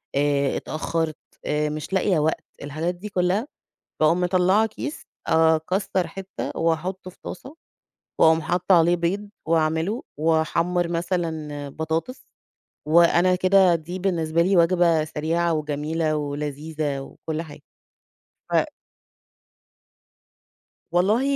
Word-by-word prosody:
آآ 140 Hz, -1 st, +1 dB
اتأخرت، 160 Hz, 0 st, -2 dB, 0.3 s
آآ 150 Hz, 0 st, 0 dB
مش 155 Hz, +4 st, -6 dB
لاقية 190 Hz, -3 st, +2 dB
وقت. 155 Hz, +1 st, 0 dB, 0.2 s
الحاجات 155 Hz, +5 st, -3 dB
دي 210 Hz, +4 st, -8 dB
كلّها. 190 Hz, +6 st, 0 dB, 0.5 s
باقوم 165 Hz, +4 st, +4 dB
مطلعة 185 Hz, +4 st, +3 dB
كيس، 295 Hz, +8 st, -7 dB, 0.2 s
آآ 160 Hz, 0 st, +4 dB
أكسر 185 Hz, +2 st, -1 dB
حِتّة، 190 Hz, +2 st, -6 dB
وأحطه 175 Hz, +3 st, -1 dB
في -, -, -25 dB
طاسة، 270 Hz, -, -8 dB, 0.7 s
وأُقوم 160 Hz, 0 st, +5 dB
حاطّة 180 Hz, +2 st, +2 dB
عليه 170 Hz, +2 st, +4 dB
بيض، 195 Hz, +5 st, -2 dB, 0.2 s
واعمله، 160 Hz, +7 st, +1 dB, 0.2 s
واحمر 165 Hz, +2 st, +1 dB
مثلًا 165 Hz, -4 st, -3 dB
بطاطس. 160 Hz, -, -4 dB, 0.6 s
وأنا 170 Hz, +3 st, +5 dB
كده 185 Hz, -1 st, +4 dB
دي 175 Hz, +3 st, -5 dB
بالنسبة 170 Hz, -3 st, +1 dB
لي 185 Hz, +2 st, +3 dB
وجبة 170 Hz, -2 st, +4 dB
سريعة، 165 Hz, +2 st, 0 dB
وجميلة، 155 Hz, +1 st, -1 dB
ولذيذة، 145 Hz, 0 st, -3 dB
وكلّ 155 Hz, +3 st, -5 dB
حاجة. 155 Hz, -3 st, -11 dB, 0.9 s
ف -, -, 0 dB, 2.4 s
والله 200 Hz, +8 st, +3 dB
165 Hz, 110 wpm, -24 LUFS, 155-180 Hz, 2.4 s, وأُقوم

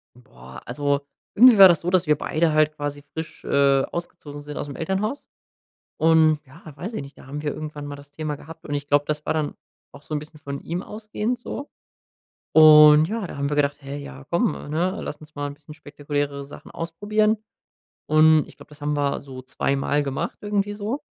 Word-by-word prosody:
Boah, 65 Hz, -, -14 dB
also, 140 Hz, +3 st, -1 dB, 0.3 s
irgendwie 240 Hz, 0 st, +8 dB
war 195 Hz, -1 st, +11 dB
das 170 Hz, -3 st, +3 dB
so, 175 Hz, -, -2 dB
dass 185 Hz, -1 st, +2 dB
wir 150 Hz, -1 st, +3 dB
beide 155 Hz, +1 st, 0 dB
halt 155 Hz, 0 st, +3 dB
quasi 145 Hz, -1 st, -4 dB
frisch, 160 Hz, 0 st, -7 dB
äh, 140 Hz, -1 st, +3 dB
ausgezogen 165 Hz, -4 st, -7 dB
sind 145 Hz, 0 st, -8 dB
ausm 145 Hz, -2 st, -5 dB
Elternhaus. 195 Hz, -, -2 dB, 0.7 s
Und 160 Hz, -1 st, +4 dB
ja, 140 Hz, +5 st, -17 dB
weiß 185 Hz, +10 st, -6 dB
ich 220 Hz, -, -4 dB
nicht, 140 Hz, +1 st, -12 dB
da -, -, -15 dB
haben 145 Hz, +2 st, -6 dB
wir 150 Hz, -, -2 dB
irgendwann 150 Hz, -1 st, -7 dB
mal 145 Hz, 0 st, -6 dB
das 145 Hz, 0 st, -15 dB
Thema 150 Hz, +1 st, -4 dB
gehabt 160 Hz, +3 st, -12 dB
und 145 Hz, -, -3 dB
ich 145 Hz, 0 st, -3 dB
glaube, 145 Hz, 0 st, +3 dB
das 150 Hz, 0 st, -3 dB
war -, -, 0 dB
dann 155 Hz, -2 st, -2 dB, 0.4 s
auch 140 Hz, -, -14 dB
so 155 Hz, -, -10 dB
'n -, -, 0 dB
bisschen 150 Hz, +1 st, -12 dB
von 140 Hz, -1 st, -6 dB
ihm 175 Hz, +3 st, -4 dB
ausgehend 215 Hz, +3 st, -4 dB
so. 280 Hz, +3 st, -7 dB, 0.8 s
Und 150 Hz, 0 st, +8 dB
ja, 220 Hz, 0 st, -3 dB
da -, -, -9 dB
haben 140 Hz, 0 st, -1 dB
wir 145 Hz, -, -2 dB
gedacht: 145 Hz, 0 st, +1 dB
„Hä 140 Hz, 0 st, -7 dB
ja, 140 Hz, -1 st, -10 dB
komm, 205 Hz, +7 st, +2 dB, 0.2 s
ne? 180 Hz, +6 st, 0 dB
Lass 150 Hz, -, -6 dB
uns 150 Hz, 0 st, -16 dB
mal 145 Hz, 0 st, -2 dB
'n 145 Hz, -, -6 dB
bisschen 150 Hz, +1 st, -14 dB
spektakuläre 145 Hz, -1 st, -4 dB
Sachen 140 Hz, -, -12 dB
ausprobieren.” 210 Hz, +6 st, 0 dB, 0.7 s
Und 155 Hz, 0 st, +5 dB
ich -, -, -17 dB
glaube, -, -, -15 dB
das 150 Hz, -1 st, -16 dB
haben 150 Hz, 0 st, -1 dB
wir 140 Hz, -1 st, 0 dB
so 130 Hz, -2 st, -10 dB
2 135 Hz, +1 st, -1 dB
Mal 145 Hz, +2 st, 0 dB
gemacht 135 Hz, -1 st, -3 dB
irgendwie 205 Hz, 0 st, -1 dB
so. 215 Hz, +7 st, -4 dB
150 Hz, 210 wpm, -23 LUFS, 145-170 Hz, 0.8 s, war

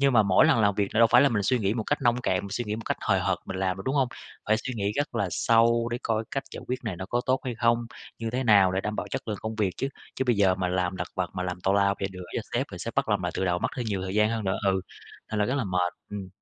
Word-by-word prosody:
nhưng 140 Hz, -1 st, +4 dB
mà 115 Hz, -3 st, +6 dB
mỗi 95 Hz, -2 st, +5 dB
lần 115 Hz, -, +4 dB
làm 100 Hz, -2 st, +3 dB
việc 100 Hz, -1 st, -1 dB
là -, -, +2 dB
đâu 115 Hz, -, +8 dB
phải 120 Hz, +3 st, +6 dB
là 140 Hz, -, +5 dB
mình 105 Hz, -3 st, 0 dB
suy 125 Hz, +5 st, +2 dB
nghĩ 100 Hz, -1 st, 0 dB
một 115 Hz, -2 st, -2 dB
cách 145 Hz, -, 0 dB
nông 120 Hz, -1 st, +3 dB
cạn, 95 Hz, -6 st, +1 dB
mình 100 Hz, -, -8 dB
suy 120 Hz, +4 st, -2 dB
nghĩ 105 Hz, 0 st, -3 dB
một 115 Hz, -, -6 dB
cách -, -, -1 dB
hời -, -, +2 dB
hợt -, -, +1 dB
mình -, -, -5 dB
làm 95 Hz, -1 st, 0 dB
được, 95 Hz, -, -7 dB
đúng 130 Hz, -, 0 dB
hông? 135 Hz, -3 st, +2 dB, 0.4 s
Phải 110 Hz, -, +4 dB
suy 125 Hz, +3 st, -5 dB
nghĩ 100 Hz, -2 st, -1 dB
rất 145 Hz, -3 st, -2 dB
là 100 Hz, -4 st, 0 dB
sâu 115 Hz, +3 st, +3 dB
để 120 Hz, -, -2 dB
coi 115 Hz, -1 st, 0 dB
cách 135 Hz, -, -2 dB
giải -, -, -6 dB
quyết 125 Hz, -, -1 dB
này 105 Hz, -6 st, -3 dB
nó 95 Hz, -, -6 dB
có 120 Hz, +4 st, 0 dB
tốt 130 Hz, +1 st, +2 dB
hay 125 Hz, -2 st, -3 dB
không? 115 Hz, +1 st, +2 dB, 0.3 s
Như 115 Hz, -1 st, -3 dB
thế 130 Hz, +3 st, -1 dB
nào 100 Hz, -5 st, +5 dB
để 95 Hz, -, 0 dB
đảm 105 Hz, +1 st, -3 dB
bảo -, -, -3 dB
chất -, -, -4 dB
lượng 105 Hz, -2 st, -2 dB
công 110 Hz, 0 st, -4 dB
việc 105 Hz, -4 st, +1 dB
chứ, 135 Hz, -, -1 dB, 0.3 s
chứ 130 Hz, -, 0 dB
bây 120 Hz, -3 st, +2 dB
giờ 95 Hz, -2 st, +4 dB
mà 95 Hz, -1 st, -1 dB
làm 90 Hz, 0 st, -1 dB
lặt -, -, -4 dB
vặt 90 Hz, -2 st, -2 dB
mà 90 Hz, -, -2 dB
làm 90 Hz, 0 st, -4 dB
tào 95 Hz, +2 st, +2 dB
lao 100 Hz, 0 st, +3 dB
rồ 95 Hz, -, 0 dB
gửi 90 Hz, -1 st, -8 dB
cho -, -, 0 dB
sếp -, -, +1 dB
rồi -, -, -8 dB
sếp -, -, -5 dB
bắt -, -, +1 dB
làm -, -, +1 dB
lại -, -, -2 dB
từ -, -, -1 dB
đầu 90 Hz, -1 st, +1 dB
mất -, -, 0 dB
thêm 120 Hz, -, -3 dB
nhiều 100 Hz, -3 st, -2 dB
thời 95 Hz, 0 st, -4 dB
gian 105 Hz, +1 st, +3 dB
hơn 115 Hz, -2 st, -2 dB
nữa, 95 Hz, -, 0 dB
ừ, 95 Hz, -1 st, +2 dB, 0.5 s
thành 110 Hz, -, -1 dB
ra 105 Hz, -, +3 dB
rất 130 Hz, -, 0 dB
là 135 Hz, -, 0 dB
mệt, 90 Hz, -2 st, 0 dB, 0.2 s
ừm. 100 Hz, -2 st, -6 dB
105 Hz, 340 wpm, -27 LUFS, 95-120 Hz, 0.5 s, đâu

